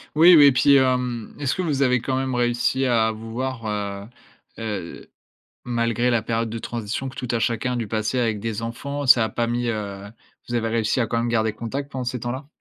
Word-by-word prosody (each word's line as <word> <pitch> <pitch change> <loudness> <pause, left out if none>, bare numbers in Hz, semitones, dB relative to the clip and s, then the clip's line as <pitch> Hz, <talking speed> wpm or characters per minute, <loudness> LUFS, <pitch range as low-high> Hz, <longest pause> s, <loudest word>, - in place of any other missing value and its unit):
Oui, 170 +3 +8
oui 150 -2 +8
et 140 - +8
puis, 130 +2 +4
hem, 125 -3 0
est-ce 140 -3 0
que - - -2
vous 150 -6 -1
avez 125 -2 +2
quand 130 +1 -1
même 130 -1 -1
réussi 120 +2 +1
à 115 -3 +2
vous 110 +1 -9
voir, 130 -1 -4
heu, 100 -1 -4 0.5
heu, 105 -6 -6 0.6
malgré 120 0 0
la 120 -2 +2
période 115 0 -1
de 115 +1 -5
transition 120 +3 -4
que 130 - -13
tout 125 - -5
a - - 0
chacun 115 +2 0
a - - -2
dû 115 -3 -3
passer 110 +3 -1
avec 115 -3 0
des 110 0 -4
enfants? 140 +5 -4
Ça 125 -3 +6
a - - -3
pas 120 -1 -1
mis, 120 +1 -1
heu, 100 -3 -4 0.4
vous 120 - -3
avez 115 -1 0
réussi 115 +2 +1
à 115 - 0
quand 115 - -1
même 115 +1 0
garder 110 -2 +1
contact 135 +6 -5
pendant 130 -2 -4
ces 125 -1 -3
temps-là? 130 +4 -4
120 Hz, 230 wpm, -23 LUFS, 110-130 Hz, 0.6 s, Oui